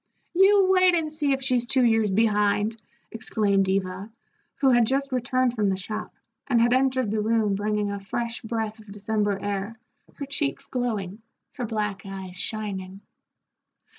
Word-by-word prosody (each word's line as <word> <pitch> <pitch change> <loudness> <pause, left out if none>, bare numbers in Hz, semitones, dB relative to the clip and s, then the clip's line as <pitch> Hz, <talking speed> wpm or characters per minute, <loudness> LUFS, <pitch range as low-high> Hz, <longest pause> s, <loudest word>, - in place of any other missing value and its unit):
"You 390 +2 +5
wait 370 -1 +5
and 310 -2 -1
see 295 -2 0
if 270 0 0
she's 250 -2 +1
two 260 -1 +4
years 225 -2 +3
behind!" 210 +1 +2 0.4
exclaimed 200 -3 0
Eva, 190 +2 -2 0.4
who 270 -2 +3
had 240 -2 +4
just 275 +2 0
returned 255 0 +1
from 210 -4 +1
the 190 - 0
shop, 215 +3 -5 0.4
and 245 -4 +3
had 240 +1 +4
entered 260 -3 +1
the 215 -1 0
room 220 -1 +1
bringing 210 0 -1
a 200 - -4
fresh 230 +4 -4
breath 220 -1 -3
of 215 -2 -14
December 205 0 -1
air, 205 +2 -4 0.4
her 280 - -5
cheeks 280 0 -2
glowing, 220 -6 -3 0.3
her 245 -4 -4
black 210 -3 -2
eyes 190 -2 -8
shining. 195 -2 -4
220 Hz, 160 wpm, -25 LUFS, 200-255 Hz, 0.4 s, You